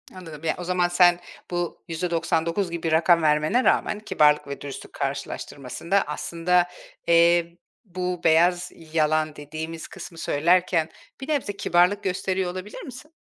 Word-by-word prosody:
Anladım. 165 Hz, -5 st, -10 dB
Ya, 165 Hz, -, 0 dB
o 180 Hz, -, -6 dB
zaman 180 Hz, 0 st, +1 dB
sen 175 Hz, 0 st, +4 dB, 0.3 s
bu 175 Hz, -1 st, -3 dB
%99 170 Hz, +2 st, -1 dB
gibi 165 Hz, -1 st, -2 dB
rakam 170 Hz, +1 st, +4 dB
vermene 155 Hz, +10 st, +2 dB
rağmen 210 Hz, -, +2 dB
kibarlık 150 Hz, -9 st, +2 dB
ve 140 Hz, -, -7 dB
dürüstlük 140 Hz, -1 st, -8 dB
karşılaştırmasında 140 Hz, +5 st, -2 dB
aslında, 175 Hz, +1 st, 0 dB, 0.4 s
eee, 170 Hz, 0 st, +4 dB, 0.3 s
bu 180 Hz, -2 st, -4 dB
beyaz 175 Hz, +2 st, +3 dB, 0.2 s
yalan 155 Hz, -1 st, +1 dB
dediğimiz 155 Hz, +2 st, -7 dB
kısmı 165 Hz, -, -10 dB
söylerken 170 Hz, +1 st, +2 dB, 0.3 s
bir 265 Hz, -, -6 dB
nebze 280 Hz, -9 st, -1 dB
kibarlık 180 Hz, +4 st, +2 dB
gösteriyor 185 Hz, -1 st, -1 dB
olabilir 185 Hz, +3 st, -8 dB
misin? 265 Hz, +4 st, -11 dB
170 Hz, 130 wpm, -24 LUFS, 160-180 Hz, 0.4 s, sen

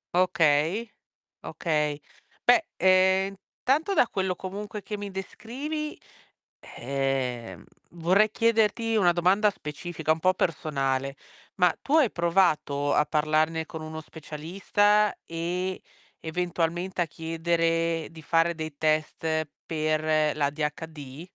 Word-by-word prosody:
Okay. 170 Hz, +4 st, +2 dB, 0.5 s
Okay. 150 Hz, -3 st, -1 dB, 0.4 s
Beh, 245 Hz, +7 st, +5 dB
ehm, 190 Hz, +1 st, +4 dB, 0.3 s
intanto, 310 Hz, +9 st, +1 dB
da 245 Hz, -, +4 dB
quello 190 Hz, -1 st, -1 dB
comunque 205 Hz, +3 st, -6 dB
che 210 Hz, -, -5 dB
mi 205 Hz, -1 st, -6 dB
descrivi, 275 Hz, +11 st, -5 dB, 0.6 s
ehm, 125 Hz, -6 st, -3 dB, 0.3 s
vorrei 185 Hz, +6 st, +3 dB
chiederti 225 Hz, 0 st, +2 dB
una 175 Hz, -4 st, +4 dB
domanda 190 Hz, +5 st, +3 dB
specifica, 160 Hz, -2 st, -4 dB
un 160 Hz, -, +1 dB
po' 185 Hz, +2 st, +3 dB
personale: 135 Hz, -6 st, -1 dB, 0.4 s
ma 180 Hz, -2 st, +4 dB
tu 290 Hz, -, +1 dB
hai 285 Hz, -8 st, +4 dB
provato 165 Hz, -5 st, +1 dB
a 150 Hz, -, +3 dB
parlarne 155 Hz, +1 st, +1 dB
con 160 Hz, 0 st, -8 dB
uno 155 Hz, 0 st, -6 dB
specialista 195 Hz, +7 st, +1 dB
e, 180 Hz, +3 st, -3 dB, 0.4 s
eventualmente, 175 Hz, +2 st, -2 dB
a -, -, +3 dB
chiedere 165 Hz, 0 st, -1 dB
di 160 Hz, -1 st, -12 dB
fare 165 Hz, +2 st, +2 dB
dei 155 Hz, -2 st, -6 dB
test 155 Hz, 0 st, 0 dB, 0.2 s
per 155 Hz, -1 st, +1 dB
l'ADHD? 150 Hz, +1 st, -4 dB
165 Hz, 110 wpm, -27 LUFS, 155-190 Hz, 0.6 s, Beh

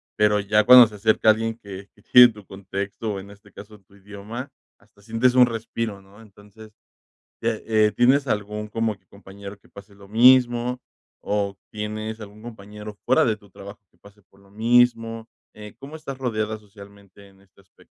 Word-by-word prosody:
pero 105 Hz, 0 st, +2 dB
ya 105 Hz, +1 st, +2 dB
cuando 125 Hz, +1 st, +9 dB
se 110 Hz, -, -10 dB
acerca 110 Hz, +1 st, +3 dB
alguien 115 Hz, +1 st, -3 dB
que 100 Hz, -3 st, -11 dB, 0.2 s
tiene 125 Hz, 0 st, +10 dB
tu 105 Hz, -2 st, -15 dB
contexto, 100 Hz, +3 st, -6 dB
o -, -, -5 dB
en 100 Hz, +1 st, -12 dB
este 100 Hz, 0 st, -18 dB
caso, 105 Hz, +2 st, -14 dB
tu 95 Hz, +1 st, -26 dB
idioma, 105 Hz, +7 st, -9 dB, 0.3 s
hasta 100 Hz, 0 st, -27 dB
sientes 115 Hz, +4 st, +1 dB
un 125 Hz, -1 st, +6 dB
respiro, 115 Hz, -3 st, -5 dB
¿no? 100 Hz, +3 st, -19 dB
Entonces, 105 Hz, +1 st, -17 dB, 0.7 s
ya 115 Hz, -, 0 dB, 0.2 s
Eh, 110 Hz, -1 st, +2 dB
¿tienes 135 Hz, +3 st, +3 dB
algún, 105 Hz, -1 st, -3 dB
como 115 Hz, 0 st, -2 dB
que, 95 Hz, -, -40 dB
compañero 100 Hz, +1 st, -12 dB
que 100 Hz, -, -26 dB
pase 100 Hz, 0 st, -15 dB
lo 100 Hz, 0 st, -16 dB
mismo? 120 Hz, +2 st, +4 dB, 0.4 s
¿O 100 Hz, -1 st, -2 dB
tienes 110 Hz, +1 st, -6 dB
algún 105 Hz, 0 st, -12 dB
compañero, 105 Hz, -2 st, -11 dB
fuera -, -, +3 dB
de 110 Hz, -, 0 dB
tu 100 Hz, -1 st, -21 dB
trabajo, 100 Hz, +2 st, -12 dB
que -, -, -34 dB
pase 100 Hz, +1 st, -20 dB
por 100 Hz, -, -27 dB
lo 100 Hz, 0 st, -23 dB
mismo? 115 Hz, 0 st, +1 dB, 0.3 s
Eh, 105 Hz, -1 st, -12 dB
¿cómo 140 Hz, +3 st, -10 dB
estás 140 Hz, -4 st, -8 dB
rodeada, 110 Hz, -4 st, -3 dB
socialmente, 100 Hz, -1 st, -17 dB
en 95 Hz, 0 st, -23 dB
este 100 Hz, 0 st, -25 dB
aspecto? 95 Hz, -, -25 dB
105 Hz, 180 wpm, -23 LUFS, 100-115 Hz, 0.7 s, tiene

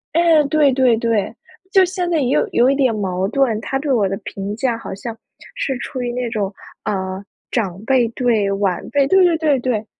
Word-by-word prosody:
哎， 335 Hz, -2 st, +5 dB
对 300 Hz, -3 st, +4 dB
对 255 Hz, -2 st, +3 dB
对。 230 Hz, -3 st, -1 dB, 0.4 s
就 380 Hz, -1 st, +6 dB
现 360 Hz, -1 st, -2 dB
在 330 Hz, -, +1 dB
也 260 Hz, -4 st, 0 dB
有 -, -, +2 dB
有 245 Hz, +2 st, +4 dB
一 275 Hz, -, +2 dB
点 260 Hz, -5 st, +2 dB
矛 190 Hz, -2 st, -1 dB
盾， 230 Hz, -1 st, +1 dB
他 270 Hz, -, -2 dB
对 285 Hz, 0 st, -2 dB
我 220 Hz, -6 st, +2 dB
的 195 Hz, -, -2 dB
评 200 Hz, +1 st, -5 dB
价 240 Hz, 0 st, -1 dB
好 225 Hz, -, -7 dB
像 225 Hz, +3 st, -7 dB, 0.4 s
是 270 Hz, -, -2 dB
处 255 Hz, -, -5 dB
于 240 Hz, -1 st, -3 dB
那 245 Hz, -1 st, -2 dB
种 210 Hz, -3 st, -2 dB, 0.3 s
呃 190 Hz, -1 st, -3 dB, 0.3 s
长 195 Hz, -4 st, -2 dB
辈 255 Hz, -1 st, +2 dB
对 230 Hz, -5 st, +1 dB
晚 195 Hz, -3 st, -1 dB
辈， 285 Hz, -1 st, +3 dB
对 380 Hz, +3 st, +5 dB
对 335 Hz, -2 st, +3 dB
对 300 Hz, -5 st, +2 dB
对。 230 Hz, -4 st, -1 dB
240 Hz, 220 characters per minute, -19 LUFS, 205-275 Hz, 0.4 s, 就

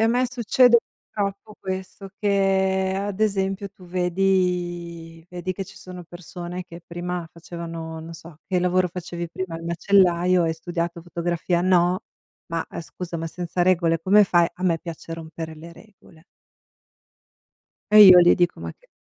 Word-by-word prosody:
e -, -, +3 dB
a 225 Hz, -, +5 dB
me 250 Hz, +2 st, +2 dB
succede 245 Hz, 0 st, +4 dB, 0.3 s
purtroppo 205 Hz, +1 st, -4 dB
questo: 190 Hz, +1 st, -6 dB
che 190 Hz, -2 st, +1 dB
ad 200 Hz, +1 st, -4 dB
esempio, 195 Hz, -1 st, 0 dB
tu 185 Hz, -1 st, -18 dB
vedi 175 Hz, -2 st, -1 dB
vedi 180 Hz, +1 st, -4 dB
che 195 Hz, +1 st, -5 dB
ci -, -, -15 dB
sono 180 Hz, -1 st, -10 dB
persone 175 Hz, +1 st, -8 dB
che 170 Hz, 0 st, -11 dB
prima 175 Hz, -1 st, -5 dB
facevano, 165 Hz, -1 st, -7 dB
non 165 Hz, +1 st, -9 dB
so: 165 Hz, -1 st, -13 dB
"Che 185 Hz, -, +1 dB
lavoro 180 Hz, 0 st, +2 dB
facevi 175 Hz, -1 st, -6 dB
prima?" 170 Hz, -1 st, -5 dB
"Il 165 Hz, -, -9 dB
macellaio." 180 Hz, 0 st, +3 dB
"E 165 Hz, -, +1 dB
hai 160 Hz, -, -1 dB
studiato 170 Hz, 0 st, -4 dB
fotografia?" 175 Hz, 0 st, -1 dB
"No." 180 Hz, 0 st, +3 dB, 0.5 s
"Ma 165 Hz, -1 st, -3 dB, 0.2 s
scusa, 170 Hz, +1 st, -7 dB
ma 165 Hz, -, -4 dB
senza 175 Hz, +1 st, -3 dB
regole 170 Hz, -2 st, +2 dB
come 205 Hz, +4 st, +5 dB
fai?" 175 Hz, -2 st, +3 dB
"A 180 Hz, -, -10 dB
me 170 Hz, -3 st, +2 dB
piace 165 Hz, 0 st, -8 dB
rompere 160 Hz, 0 st, -7 dB
le 165 Hz, +2 st, -11 dB
regole." 175 Hz, -5 st, -19 dB, 1.7 s
E 215 Hz, -, +10 dB
io 185 Hz, -3 st, +11 dB
gli 175 Hz, -, +6 dB
dico: 175 Hz, -2 st, 0 dB
"Ma -, -, -6 dB
che" -, -, -29 dB
180 Hz, 160 wpm, -23 LUFS, 170-190 Hz, 1.7 s, io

